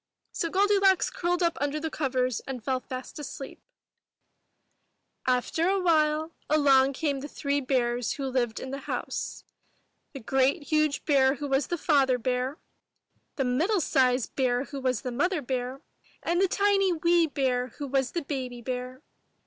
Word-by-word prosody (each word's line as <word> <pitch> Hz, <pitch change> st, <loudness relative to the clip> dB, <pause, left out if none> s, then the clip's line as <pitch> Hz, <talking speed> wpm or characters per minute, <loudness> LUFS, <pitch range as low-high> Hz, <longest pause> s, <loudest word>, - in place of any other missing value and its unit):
So 335 Hz, -, -2 dB
Goldilocks 390 Hz, 0 st, +3 dB
curled 350 Hz, +1 st, 0 dB
up 335 Hz, -1 st, 0 dB
under 290 Hz, +1 st, 0 dB
the 320 Hz, +1 st, -4 dB
covers 255 Hz, -4 st, 0 dB
and 255 Hz, -4 st, -5 dB
fell 260 Hz, +2 st, 0 dB
fast 255 Hz, +3 st, -8 dB
asleep; 275 Hz, -2 st, -8 dB, 1.7 s
After 255 Hz, +7 st, +1 dB
a 390 Hz, 0 st, +2 dB
while, 315 Hz, -2 st, +2 dB, 0.2 s
along 275 Hz, -3 st, +4 dB
came 280 Hz, -1 st, -1 dB
the 285 Hz, -, -6 dB
three 285 Hz, -1 st, -1 dB
bears 245 Hz, -3 st, 0 dB
who 275 Hz, -, -4 dB
lived 250 Hz, -4 st, -1 dB
in 260 Hz, -, -6 dB
the 275 Hz, -, -4 dB
house, -, -, -4 dB, 0.3 s
— -, -, -46 dB
the 275 Hz, -, -6 dB
great 265 Hz, +6 st, +1 dB
huge 305 Hz, -1 st, +1 dB
bear 270 Hz, -2 st, +4 dB
who 290 Hz, +1 st, -5 dB
was 270 Hz, 0 st, +1 dB
the 345 Hz, -, -2 dB
Father 275 Hz, -5 st, +3 dB
Bear, 255 Hz, +3 st, -1 dB, 0.8 s
the 270 Hz, -, 0 dB
middle 325 Hz, -, +1 dB
sized 255 Hz, -5 st, +1 dB
bear 250 Hz, -2 st, +1 dB
who 280 Hz, 0 st, -7 dB
was 255 Hz, -4 st, 0 dB
the 250 Hz, -, -3 dB
Mother 345 Hz, +8 st, +1 dB
Bear, 255 Hz, +1 st, -3 dB, 0.4 s
and 345 Hz, +2 st, +1 dB
the 390 Hz, -, +4 dB
tiny^ 390 Hz, -4 st, +2 dB
wee 340 Hz, -1 st, +4 dB
bear 255 Hz, -3 st, 0 dB
who 290 Hz, -, -4 dB
was 270 Hz, -2 st, 0 dB
the 340 Hz, -, -2 dB
Baby 255 Hz, -4 st, -5 dB
Bear. 255 Hz, +2 st, -5 dB
275 Hz, 165 wpm, -27 LUFS, 255-315 Hz, 1.7 s, along